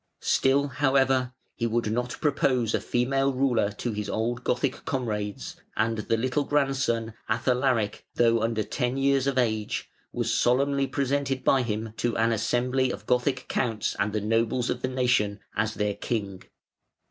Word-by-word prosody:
Still, 140 +2 +3
however, 135 -2 +2 0.2
he 115 - -1
would 115 -1 0
not 120 +2 -2
propose 130 -6 +1
a - - +1
female 135 +3 +1
ruler 125 -6 +1
to 120 +3 -3
his 105 -1 -4
old 120 +3 -2
Gothic 130 +1 -1
comrades; 105 -8 -3 0.2
and 115 0 +1
the 115 +2 0
little 130 +5 0
grandson, 135 -6 0 0.2
Athalaric, 120 -1 +1
though 115 -1 +3
under 115 -1 0
ten 125 +2 -2
years 135 0 +2
of 135 -1 0
age, 110 -4 -1 0.2
was - - -1
solemnly 140 +2 +2
presented 140 -1 -1
by 135 - +4
him 110 -2 -3
to 120 - -1
an 115 +1 +2
assembly 125 +4 +1
of - - -6
Gothic 125 +1 +1
counts 115 -5 -1
and 105 +1 +1
the 105 0 -1
nobles 115 +3 +1
of 125 - -3
the - - 0
nation 125 -5 +1 0.2
as 110 0 0
their 105 0 0
king. 100 -4 -3
125 Hz, 160 wpm, -26 LUFS, 110-135 Hz, 0.2 s, by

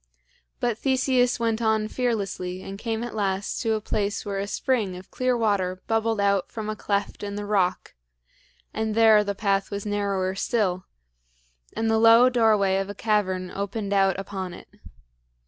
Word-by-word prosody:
But 240 -2 -1
Theseus 260 -2 +2
went 230 -1 0
on 220 -1 +1
fearlessly 200 -6 -2
and 195 +1 -8
came 225 0 -3
at 240 - -6
last 200 -2 -2
to 225 -2 +1
a 215 - 0
place 205 0 -2
where 200 -1 -3
a 200 - -3
spring 210 -3 -1
of 185 - -13
clear 255 -1 0
water 190 -5 0
bubbled 225 -1 0
out 200 -2 +1
from 215 -1 -5
a - - -4
cleft 200 -1 -2
in 200 0 -5
the 205 0 -4
rock; 195 -3 0 0.8
and 220 -1 -2
there 220 -2 +6
the 200 -1 -3
path 195 -1 0
was 200 0 -5
narrower 200 -2 -1
still, 190 -3 -1 0.9
and 225 - 0
the 225 0 +3
low 230 +2 +7
doorway 215 -6 +3
of 195 0 -3
a 205 - -6
cavern 190 -4 0
opened 200 +1 -3
out 195 -1 +2
upon 190 -2 -5
it. - - -14
205 Hz, 170 wpm, -25 LUFS, 195-225 Hz, 0.9 s, low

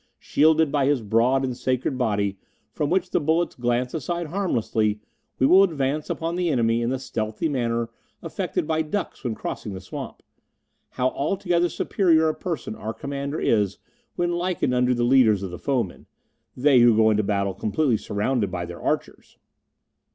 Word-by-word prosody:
Shielded 155 0 +3
by 140 -2 +2
his 140 -5 +1
broad 120 +6 +2
and 130 -2 -3
sacred 130 +2 -1
body, 100 -6 -1 0.3
from 145 - -2
which 185 +3 0
the - - +2
bullets 160 +3 +1
glance 120 +1 -1
aside 170 +3 -3
harmlessly, 115 - 0 0.4
we 130 - +3
will 185 +7 +7
advance 150 -5 0
upon 165 +1 -2
the 180 -1 0
enemy 115 -4 +2
in 120 - 0
the 130 - -1
stealthy 110 +2 -3
manner 120 -5 -1 0.4
affected - - -2
by 160 0 0
ducks 185 +6 -4
when 120 -4 -2
crossing 105 - -5
the 95 - -6
swamp. 90 -1 -8 0.7
How 130 0 0
altogether 175 +4 0
superior 160 -2 +2
a - - 0
person 165 - -4
our 110 +1 -6
Commander 140 +1 -4
is 105 -3 +1 0.4
when 175 0 0
likened 175 -6 -1
unto 125 0 +2
the 120 - 0
leaders 120 -5 +4
of 95 - -5
the 90 - -7
foemen 125 -10 -2 0.5
they 135 0 +5
who 120 -1 +6
go 110 0 +5
into 105 0 +2
battle 100 -1 -1
completely 120 +4 0
surrounded 105 +1 -1
by 90 -1 -4
their 85 -1 -9
archers!" - - -3
130 Hz, 170 wpm, -24 LUFS, 110-155 Hz, 0.7 s, will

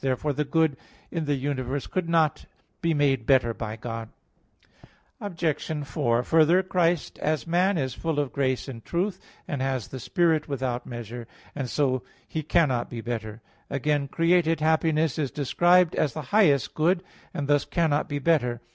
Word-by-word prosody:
Therefore 135 +2 0
the 150 +2 -1
good 155 -1 +1 0.3
in 165 -3 -2
the 145 -1 +1
universe 135 0 -2
could 180 -3 -3
not 160 -2 +2 0.3
be 165 - +1
made 140 -6 +1
better 125 -4 +4
by 110 -1 -5
God. 115 0 -6 1.1
Obj. 160 -5 -2
4: 120 -1 0
Further, 165 +5 +4
Christ 175 -3 0
as 155 -1 -1
man 180 +3 +2
is 130 -4 -1
full 160 +1 -3
of 145 -3 -2
grace 130 -2 0
and 115 -4 -8
truth, 185 +3 -2 0.3
and 145 -7 -3
has 130 -5 -2
the 130 - -6
Spirit 165 - +1
without 130 -3 -3
measure; 120 -1 -7 0.3
and 130 -3 -4
so 130 -3 +1 0.3
He 160 - -3
cannot 140 -5 +1
be 120 -2 -6
better. 110 -2 -5 0.3
Again 140 +1 0
created 165 +1 +2
happiness 160 -1 +2
is 145 -3 0
described 175 +6 +3
as 150 - 0
the 155 - -4
highest 160 -11 +4
good, 175 +4 +2 0.3
and 145 - -3
thus 145 0 +3
cannot 160 -4 0
be 145 - -2
better. 130 -6 +1
145 Hz, 165 wpm, -26 LUFS, 130-165 Hz, 1.1 s, better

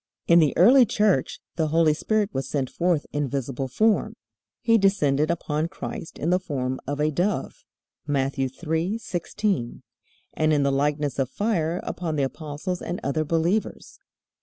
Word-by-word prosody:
In 170 0 +6
the 155 -3 +2
early 255 +2 +7
Church 205 -10 +1 0.2
the 160 -2 +1
Holy 160 0 +3
Spirit 215 +6 0
was 135 - -3
sent 135 -3 -2
forth 170 -3 0
in 145 -1 0
visible 135 0 -3
form. 215 - +1 0.4
He 230 -2 +3
descended 155 -7 +2
upon 155 -2 -1
Christ 170 -2 -7
in 165 - -1
the 180 - +3
form 130 -7 -3
of 145 +1 -3
a 150 +1 +2
dove 180 +6 -2 0.4
(Matt. 140 -1 0
3:16), 170 - -2 0.5
and 155 0 +1
in 145 -2 +3
the 140 - +2
likeness 145 +1 0
of 130 -2 0
fire 175 -3 -1
upon 165 -3 -3
the 145 - +1
apostles 155 +6 -4
and 175 +2 -4
other 140 +3 0
believers. 165 +7 -1
155 Hz, 155 wpm, -25 LUFS, 140-180 Hz, 0.5 s, early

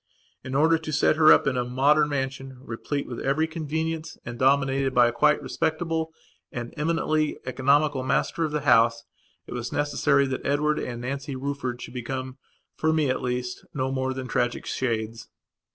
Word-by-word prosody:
In 130 +1 -5
order 160 +3 +4
to 160 -1 -6
set 145 +1 +3
her 155 -1 +7
up - - +6
in 135 - +1
a 125 - +1
modern 145 +5 +3
mansion, 135 -1 -3
replete 135 +4 -4
with 120 - -6
every 145 +4 +1
convenience 160 0 -3
and 120 0 -7
dominated 135 0 +2
by 120 0 +7
a - - +1
quite 150 +5 +3
respectable 160 0 -1 0.4
and 120 -1 -6
eminently 155 -1 0
economical 140 +2 +2
master 130 +5 0
of 155 - -1
the 150 0 -1
house, 115 -3 +4 0.4
it - - -8
was 120 -1 -4
necessary 145 -1 +2
that 130 -1 -3
Edward 150 +2 +1
and 120 -1 -5
Nancy 140 +2 -4
Rufford 130 -2 -4
should - - -9
become, 130 +1 -5 0.4
for 160 - +1
me 155 -4 +2
at 130 - -2
least, 125 0 -3
no 130 -1 -1
more 130 0 -1
than 130 -1 -5
tragic 120 -1 -1
shades. 115 -2 -2
135 Hz, 175 wpm, -25 LUFS, 125-150 Hz, 0.4 s, her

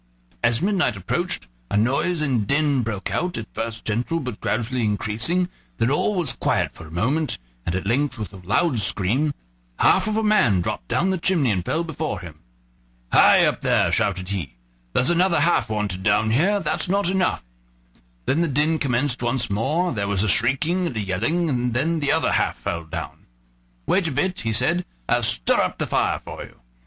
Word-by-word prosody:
As 120 +3 +2
midnight 185 - +1
approached, 90 -8 -2 0.2
a - - 0
noise 140 +9 +1
and 125 -8 +1
din 140 -1 +2
broke 110 -4 -4
out, 180 0 -1
at 110 - -4
first 115 0 -4
gentle, 120 +10 -1
but 125 -7 -6
gradually 120 +2 -1
increasing; 110 - 0 0.3
then 115 +3 +1
all 200 +8 +1
was 165 -9 +1
quiet - - 0
for 80 - -12
a - - -14
minute, 130 - -1 0.3
and 85 - 0
at 95 - -3
length, 130 +4 0
with 105 -2 -6
a - - -9
loud 115 - 0
scream, 105 +10 +1 0.5
half - - +4
of 215 0 0
a 220 - +1
man 210 - +3
dropped - - -4
down 190 +3 +1
the 190 - -1
chimney 165 - +2
and 90 -3 -1
fell 160 - -1
before 160 -2 -4
him. 80 -3 -11 0.7
"Hi, - - +6
up - - 0
there!" - - +2
shouted 95 -2 0
he; 85 -12 -4 0.4
"there's 130 - +3
another 175 0 +3
half 165 -10 +2
wanted 105 -4 -2
down 105 +2 +2
here, 190 - +2
that's 190 - -1
not 200 0 +2
enough"; 185 - 0 0.8
then 155 - +1
the 170 - +2
din 150 +3 +1
commenced 130 -1 0
once 120 -2 +1
more, 150 - 0
there 100 -3 -2
was 100 -1 +1
a - - 0
shrieking 135 - +1
and 125 - -5
a - - 0
yelling, 115 - 0
and 125 -4 -1
then 160 +6 +1
the 145 -2 +1
other - - +2
half - - +1
fell 85 -1 -4
down. 80 - -7 0.6
"Wait 190 -4 +2
a - - -2
bit," 180 +7 -1
he 115 - -2
said; 145 +11 +1 0.2
"I'll - - +2
stir - - +2
up - - -1
the - - -1
fire - - +1
for - - -9
you." - - -15
125 Hz, 195 wpm, -23 LUFS, 105-165 Hz, 0.8 s, Hi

